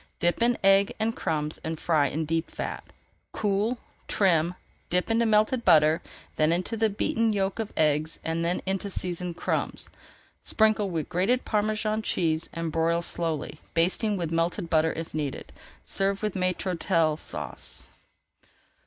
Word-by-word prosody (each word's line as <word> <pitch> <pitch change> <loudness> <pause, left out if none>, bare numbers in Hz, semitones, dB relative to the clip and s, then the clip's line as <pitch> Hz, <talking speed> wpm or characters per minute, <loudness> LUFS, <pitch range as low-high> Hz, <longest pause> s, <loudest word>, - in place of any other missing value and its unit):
Dip 175 +5 +1
in 240 0 +3
egg 195 +1 +5
and 225 +1 0
crumbs 150 -1 -1
and 160 0 -3
fry 155 -4 +2
in 155 +4 -2
deep 165 +2 -1
fat. - - -5 0.5
Cool, 210 +4 0 0.3
trim, 175 -3 +2 0.3
dip 180 +5 +1
into 230 0 +3
melted 215 +3 +3
butter, 155 -1 +5 0.4
then 155 +1 +3
into 180 +6 0
the 220 0 +2
beaten 225 +2 +1
yolks 195 +1 -1
of 215 - -5
eggs, 155 +1 +2
then 165 +2 -1
into 195 +1 -2
seasoned 180 -2 -4
crumbs. - - -2 0.5
Sprinkle 215 -2 +2
with 165 -4 -2
grated 195 +9 +1
Parmesan 215 0 0
cheese 160 -6 0
and 165 -1 -3
broil 165 +1 +1
slowly, 155 -4 -3
basting 190 +5 +1
with 170 -3 -3
melted 165 +1 -1
butter 160 0 +3
if 165 0 -6
needed. 150 -3 -4 0.3
Serve 195 +1 0
with 210 -2 0
Maître 185 0 -1
d'Hôtel 160 -2 +1
Sauce. - - -7
180 Hz, 145 wpm, -27 LUFS, 160-210 Hz, 0.5 s, egg